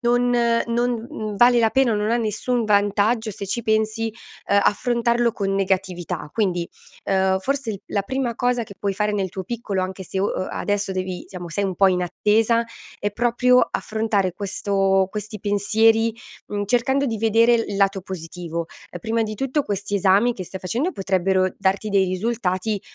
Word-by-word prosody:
non 245 Hz, 0 st, +2 dB, 0.4 s
non, 240 Hz, +1 st, +1 dB, 0.2 s
mhmm, 215 Hz, -2 st, -5 dB
vale 240 Hz, +2 st, +6 dB
la 225 Hz, -1 st, +4 dB
pena, 265 Hz, -2 st, +3 dB
non 210 Hz, +1 st, 0 dB
ha 235 Hz, -, +3 dB
nessun 230 Hz, +2 st, -1 dB
vantaggio, 210 Hz, +2 st, +2 dB
se 200 Hz, 0 st, -7 dB
ci 230 Hz, +5 st, -2 dB
pensi, 220 Hz, +1 st, 0 dB, 0.4 s
ehm, 200 Hz, 0 st, +4 dB
affrontarlo 235 Hz, +1 st, +1 dB
con 195 Hz, -3 st, -2 dB
negatività. 185 Hz, -5 st, -2 dB
Quindi, 180 Hz, -6 st, 0 dB, 0.4 s
ehm, 190 Hz, -1 st, +2 dB
forse 275 Hz, +1 st, -2 dB
il 200 Hz, -3 st, -6 dB
la 200 Hz, -, -1 dB
prima 255 Hz, +2 st, -2 dB
cosa 245 Hz, -1 st, +1 dB
che 200 Hz, -2 st, -10 dB
puoi 200 Hz, -1 st, -1 dB
fare 210 Hz, +1 st, 0 dB
nel 195 Hz, -2 st, -1 dB
tuo 190 Hz, +2 st, -6 dB
piccolo, 205 Hz, -3 st, -3 dB
anche 190 Hz, +1 st, -5 dB
se, 190 Hz, -, -4 dB
o 200 Hz, -, +2 dB, 0.2 s
o -, -, -4 dB
adesso 205 Hz, -1 st, -1 dB
devi 185 Hz, -1 st, -4 dB
siamo 180 Hz, -2 st, -7 dB
sei 200 Hz, +5 st, -1 dB
un 190 Hz, -2 st, -2 dB
po' 195 Hz, +2 st, +5 dB
in 180 Hz, -1 st, +1 dB
attesa, 220 Hz, +6 st, +2 dB, 0.3 s
è 205 Hz, -, -1 dB
proprio 245 Hz, +3 st, +3 dB
affrontare 215 Hz, -4 st, 0 dB
questo 195 Hz, 0 st, +1 dB
questi 210 Hz, 0 st, -6 dB
pensieri, 220 Hz, +3 st, +2 dB, 0.3 s
mhmm, 205 Hz, 0 st, -3 dB
cercando 250 Hz, +5 st, +1 dB
di 225 Hz, -5 st, -2 dB
vedere 230 Hz, +2 st, +4 dB
l 225 Hz, -, -1 dB
il -, -, -3 dB
lato 195 Hz, 0 st, +2 dB
positivo. 170 Hz, -2 st, -6 dB, 0.2 s
Ehm, 175 Hz, -, -7 dB
prima 225 Hz, +4 st, 0 dB
di 215 Hz, 0 st, -3 dB
tutto 270 Hz, +6 st, -1 dB
questi 205 Hz, -1 st, -2 dB
esami 200 Hz, +5 st, +4 dB
che 190 Hz, -5 st, -7 dB
stai 190 Hz, +2 st, -8 dB
facendo 245 Hz, -, -1 dB
potrebbero 190 Hz, -1 st, +1 dB
darti 195 Hz, +2 st, 0 dB
dei 195 Hz, -1 st, +4 dB
risultati, 195 Hz, 0 st, -1 dB
205 Hz, 180 wpm, -22 LUFS, 190-230 Hz, 0.4 s, vale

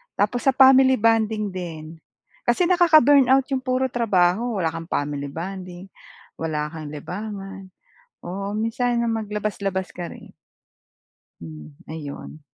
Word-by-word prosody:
tapos 210 Hz, +4 st, 0 dB
sa 270 Hz, -, +5 dB
family 265 Hz, 0 st, +7 dB
bonding 220 Hz, -2 st, +1 dB
din. 170 Hz, -4 st, -6 dB, 0.6 s
Kasi 240 Hz, +9 st, +2 dB
nakaka-burnout 290 Hz, -7 st, +5 dB
'yong 265 Hz, -2 st, -2 dB
puro 255 Hz, 0 st, 0 dB
trabaho, 215 Hz, -1 st, +1 dB
wala 165 Hz, -, +1 dB
kang 165 Hz, 0 st, -7 dB
family 145 Hz, -1 st, -2 dB
bonding, 180 Hz, +2 st, -7 dB, 0.5 s
wala 150 Hz, -2 st, -2 dB
kang 155 Hz, -2 st, -7 dB
libangan, 195 Hz, +4 st, -7 dB, 0.6 s
oo 195 Hz, +3 st, -4 dB
minsan 235 Hz, +2 st, 0 dB
maglabas-labas 210 Hz, -3 st, -3 dB
ka 175 Hz, -1 st, -5 dB
rin. -, -, -13 dB, 1.1 s
Hmm, 75 Hz, -2 st, -10 dB, 0.2 s
ayun. 155 Hz, -1 st, -8 dB
200 Hz, 115 wpm, -23 LUFS, 170-240 Hz, 1.1 s, family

